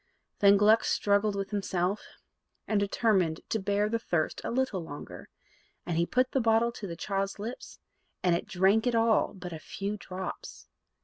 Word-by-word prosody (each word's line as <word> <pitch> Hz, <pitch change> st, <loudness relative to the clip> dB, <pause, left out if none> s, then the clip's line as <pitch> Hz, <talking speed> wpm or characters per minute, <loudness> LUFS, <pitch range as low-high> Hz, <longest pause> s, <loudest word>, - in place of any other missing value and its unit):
Then 200 Hz, 0 st, +6 dB
Gluck 215 Hz, +2 st, +5 dB
struggled 205 Hz, 0 st, +1 dB
with 195 Hz, +1 st, -4 dB
himself, 195 Hz, -1 st, -1 dB, 0.7 s
and 215 Hz, -2 st, +2 dB
determined 195 Hz, -5 st, +1 dB
to 220 Hz, -, 0 dB
bear 205 Hz, +1 st, +1 dB
the 230 Hz, +1 st, -1 dB
thirst 170 Hz, -8 st, -1 dB
a -, -, -3 dB
little 245 Hz, -7 st, 0 dB
longer; 145 Hz, -2 st, -9 dB, 0.6 s
and 175 Hz, -, -2 dB
he 170 Hz, +1 st, +1 dB
put 255 Hz, 0 st, +1 dB
the 270 Hz, -, +1 dB
bottle 225 Hz, +1 st, +3 dB
to 210 Hz, -4 st, -7 dB
the 170 Hz, -, -5 dB
child's 195 Hz, +2 st, -2 dB
lips, 225 Hz, +5 st, -7 dB, 0.5 s
and 180 Hz, -2 st, +3 dB
it -, -, -3 dB
drank 195 Hz, +6 st, +3 dB
it 245 Hz, -, +1 dB
all 225 Hz, -2 st, +2 dB
but 180 Hz, -2 st, -7 dB
a 160 Hz, -, -6 dB
few 200 Hz, +6 st, -4 dB
drops. 185 Hz, -1 st, -7 dB
200 Hz, 175 wpm, -29 LUFS, 185-220 Hz, 0.7 s, Then